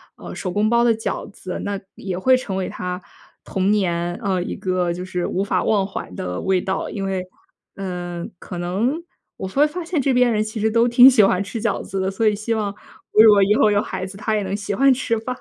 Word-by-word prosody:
呃， - - -9
手 185 - -4
工 210 +3 +1
包 235 0 +3
的 235 -1 +4
饺 220 - -4
子。 185 -2 -7
那 200 -1 -2 0.2
也 190 -2 -5
会 255 +7 +4
成 195 -7 -5
为 190 -1 -2
他 180 0 -5 0.4
童 190 +1 0
年， 175 -4 0
呃， 190 -3 0
一 - - -5
个 180 -2 -1
就 180 - -6
是 180 -1 -3
无 190 - -1
法 200 - 0
忘 200 -3 +2
怀 195 - -6
的 90 0 -4
味 190 -1 +1
道。 190 0 -2
因 200 - -5
为， 190 -1 -2 0.5
嗯， 175 -2 -5
可 175 -1 -8
能 215 - -1 0.4
我 190 - -5
突 275 - -3
然 300 - +6
发 345 +3 -5
现 330 -2 -1
这 270 0 +1
边 250 -1 +4
人 215 -1 +1
其 215 0 -5
实 220 - +2
都 230 +2 +3
挺 245 +2 +8
喜 235 -5 +5
欢 195 0 +2
吃 220 +3 -5
饺 230 -2 -1
子 195 - -5
的， 190 +1 0
所 220 +3 +1
以 210 - +3
希 215 +3 -2
望 210 -2 -1 0.4
我 215 - +7
如 220 - +9
果 205 - +5
以 200 +2 +4
后 215 - +4
有 205 0 +3
孩 185 - -4
子， 190 - -9
他 215 +2 -1
也 205 - 0
能 195 +1 -3
喜 200 -1 -3
欢 270 +4 +5
吃 235 -3 -1
吧。 250 +3 -4
200 Hz, 270 characters per minute, -21 LUFS, 185-225 Hz, 0.5 s, 如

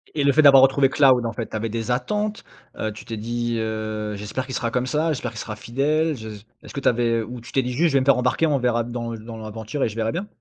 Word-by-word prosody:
Et 145 - +1
le 140 - +5
fait 155 - +5
d'avoir 135 -3 +8
retrouvé 135 0 +4
Cloud, 130 -5 +4
en 115 - -2
fait, 115 0 -5
tu - - -7
avais 110 +1 -2
des 115 +2 -3
attentes? 210 +11 -1 0.4
Heu, 110 - -1
tu 105 - -11
t'es 115 - -5
dit 120 +2 -2
heu: 110 -1 -3
«J'espère 105 +6 -4
qu'il 130 -1 -6
sera 115 -1 -1
comme 125 0 -1
ça. 155 +5 0
J'espère 125 -3 -4
qu'il 110 - -8
sera 105 -1 -5
fidèle. 145 +8 0
Je». 110 -1 -8 0.3
Est-ce - - -11
que - - -3
tu - - -1
avais 115 -1 +2
ou 120 +2 -7
tu 115 - -12
t'es 135 - +2
dit 125 0 -3
juste: 165 +7 +3
«Je - - -4
vais 135 - +5
me 130 - -1
faire 140 -2 +5
embarquer, 125 +6 +2
on 145 - +2
verra 120 -2 +1
dans 120 -1 -5
dans 115 +1 -9
l'aventure 110 +4 -4
et - - +1
je 105 - -9
verrai 115 0 0
bien»? 195 +4 -4
120 Hz, 290 wpm, -23 LUFS, 110-135 Hz, 0.4 s, d'avoir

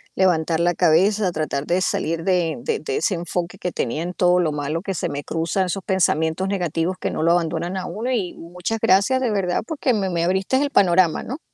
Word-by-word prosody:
levantar 165 -3 +2
la 175 +1 +2
cabeza, 185 +4 +3
tratar 150 -3 -2
de 180 +2 +1
salir 165 -2 -1
de 175 -3 +1
de 460 -2 -1
de 430 -1 -3
ese 215 - 0
enfoque 175 +2 -4
que 180 -2 -3
tenía 140 +2 -2
en 180 +1 -4
todo 180 0 +3
lo 165 -3 +1
malo 150 +2 -3
que 195 0 -3
se 175 - -2
me 145 -1 -4
cruza, 165 +6 -1
esos 185 +1 -3
pensamientos 175 -2 +1
negativos 180 -2 -1
que - - -2
no - - -3
lo 165 +1 +3
abandonan 170 +1 -1
a 185 - -4
uno. 230 +7 -3
Y, 205 -8 -1
muchas 180 +6 -4
gracias 225 +5 +3
de 245 -4 0
verdad, 190 -4 0
porque 285 -5 0
me 200 -4 0
me 170 -2 -1
abriste 190 +8 +1
el 290 - 0
panorama, 180 - +3
¿no? 265 +6 -6
180 Hz, 220 wpm, -22 LUFS, 165-195 Hz, -, cabeza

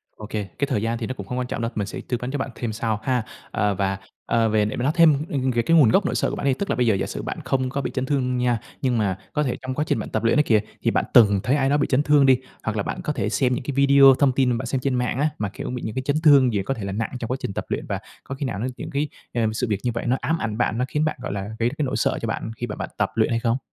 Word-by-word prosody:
Ô 110 - -9
kê, 105 -2 -3
cái 140 - +1
thời 110 -7 0
gian 115 +1 -1
thì - - -4
nó 130 - -3
cũng 100 -6 -8
hông 125 - -4
quan 125 - -2
trọng - - -4
đâu, 115 - -2
mình 105 -2 -2
sẽ - - -6
tư 125 - -1
vấn 125 +1 -4
cho 145 - -2
bạn 135 - -3
thêm 115 -3 -3
sau 110 -1 -1
ha. 125 -4 +1 0.3
Ờ, 105 -1 +1
và, 95 0 -1 0.3
ờ, 115 -1 +2
về 105 -1 +2
để 105 - -3
mà 120 - -3
nói 140 - +3
thêm, 155 -4 +5
ừm, 130 -2 0
về 120 -1 +1
cái 165 +7 +3
nguồn 140 -8 +6
gốc 190 - +3
nỗi - - -1
sợ - - +1
của - - -4
bạn - - -4
đi, 135 - +4
tức 200 +9 -4
là - - +1
bây 125 -1 +1
giờ 110 - +4
giả 95 - -1
sử - - -5
bạn - - -5
không 130 -1 0
có 140 +2 -2
bị - - -3
chấn 130 -1 -1
thương 125 -3 0
nha, 125 -2 +1 0.2
nhưng 125 -3 +1
mà 100 -3 0 0.2
có 150 - +1
thể 125 - -1
trong 130 0 -4
quá 150 +3 -1
trình - - +1
bạn - - -5
tập 110 0 -2
luyện 115 +7 +3
ấy 150 - +5
kìa, 110 -5 +3 0.2
thì - - +1
bạn - - +1
từng 105 -4 +6
thấy 130 +3 +2
ai 135 -2 +2
đó 145 - +3
bị 145 - +1
chấn 140 +2 +2
thương 145 -2 +5
đi, 130 -2 +6 0.3
hoặc 110 -1 -2
là 100 - 0
bạn - - -4
có 150 - -1
thể - - -1
xem 125 -2 +1
những - - -5
cái 140 - -3
video 140 -1 +7
thông 140 -3 +4
tin 130 0 +2
mà 120 - +1
bạn 130 - -4
xem 130 +1 -1
trên 135 -1 0
mạng 125 +1 -1
á, 150 +2 +2
mà, 105 -2 -2
kiểu, - - -6
bị 125 -1 -4
những 110 - -4
cái 130 - -1
chấn 145 - +1
thương 135 -6 +6
gì 100 - 0
có 135 - -1
thể 110 - -7
là 100 - -3
nặng 110 +3 -2
trong 115 - -4
quá 130 - 0
trình 100 - -4
tập - - -4
luyện, - - -2
và - - -2 0.2
có 135 - -6
khi 140 - -3
nào 115 -6 -3
nó 120 - -1
những - - -6
cái, 145 +2 -1 0.3
ừm, 110 -2 0
sự 125 +2 -1
việc 105 -2 0
như 125 - 0
vậy 115 - -4
nó 130 +2 +2
ám 165 +3 0
ảnh 110 -5 -3
bạn, 115 -2 0
nó 125 - +1
khiến 150 +3 0
bạn, 155 - -1
gọi 125 - -4
là, 100 - -3 0.2
gây 115 +1 +2
ra 130 - -9
cái 150 - 0
nỗi 130 - -2
sợ - - +1
cho 115 - -2
bạn 110 0 -3
khi 120 - -3
mà - - -5
bạn - - -5
tập - - +1
luyện - - +2
hay 115 - +1
không? 115 +1 +1
125 Hz, 360 wpm, -23 LUFS, 110-135 Hz, 0.3 s, video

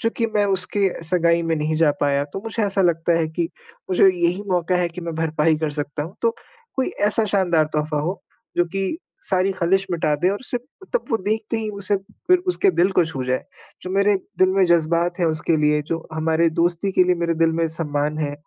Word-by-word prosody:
चूँकि 230 0 0
मैं 205 -1 +3
उसके 195 +1 0 0.2
सगाई 170 0 +2
में 165 0 0
नहीं 155 +1 -1
जा 160 -1 +4
पाया 140 0 +2
तो - - -4
मुझे 225 0 -2
ऐसा 195 -1 +1
लगता 170 -1 +2
है 160 - 0
कि 165 +1 -2 0.4
मुझे 185 +1 +6
यही 180 +1 +1
मौका 180 0 +1
है 180 -1 +1
कि 170 +2 -9
मैं 170 -1 -5
भरपाई 160 0 +1
कर 155 -1 -1
सकता 145 0 -4
हूँ। 165 +6 -8
तो 230 - +4 0.5
कोई 265 - +1 0.2
ऐसा 220 +1 +2
शानदार 175 -6 +2
तोहफ़ा 150 0 0
हो 175 +6 -3 0.3
जो 175 - +4
की 195 - -1 0.2
सारी 190 0 +1
खलिश 190 +2 +1
मिटा 165 -3 +1
दे 180 - +4
और 200 - -2
उसे 250 -1 -4 0.3
तब - - 0
वो 225 - +3
देखते 220 +2 -1
ही 220 -1 -3
उसे 200 +1 0 0.3
फिर 365 0 +6
उसके 390 +2 +3
दिल 185 - +2
को 175 - +4
छू 140 -5 -3
जाए। 130 0 -1 0.4
जो 185 - -6
मेरे 200 +2 +3 0.2
दिल 185 - +5
में 190 0 +3
जज़्बात 170 +1 +2
है 170 - +3
उसके 160 0 +1
लिए 150 0 +2
जो 165 -1 -3
हमारे 160 +1 +2
दोस्ती 175 +4 0
के 185 - +4
लिए 180 - +3
मेरे 170 -1 0
दिल 165 0 +2
में 165 0 +1
सम्मान 150 -1 -2
है, 145 -2 -1
170 Hz, 220 wpm, -22 LUFS, 160-195 Hz, 0.5 s, मुझे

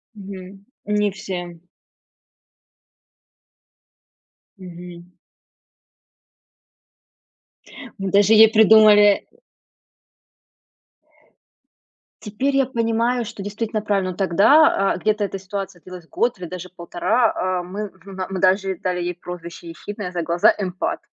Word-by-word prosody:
Мгм, 195 -1 -11 0.2
не 210 -1 0
все. 175 -3 -7 3.0
Мгм. 175 -1 -12 2.8
Мы 195 -1 -4
даже 205 +2 +4
ей 220 0 +8
придумали, 215 -1 +6 0.3
э - - -32 2.9
Теперь 255 +7 -2
я 270 - +3
понимаю, 235 0 -1
что 210 -3 -8
действительно 215 +1 -4
правильно, 195 -3 -1
но 175 - -11
тогда, 195 - +4
а, - - -5
где-то 215 +2 0
эта 195 - -5
ситуация 190 -2 -7
длилась 180 -3 -12
год 235 -5 -1
или 180 - -6
даже 180 0 -8
1,5, 185 +1 -1
э, - - -9
мы 200 +4 -6
в 190 -2 -26
на 190 -1 -6
мы 190 -1 -4
даже 190 +1 +2
ей 190 - -4
дали 180 -1 -2
ей 175 0 -3
прозвище 170 -1 -10
ехидное 200 +2 -7
за 175 -1 -3
глаза- 170 +1 +3
эмпат. 205 - -3
195 Hz, 115 wpm, -21 LUFS, 180-215 Hz, 3.0 s, ей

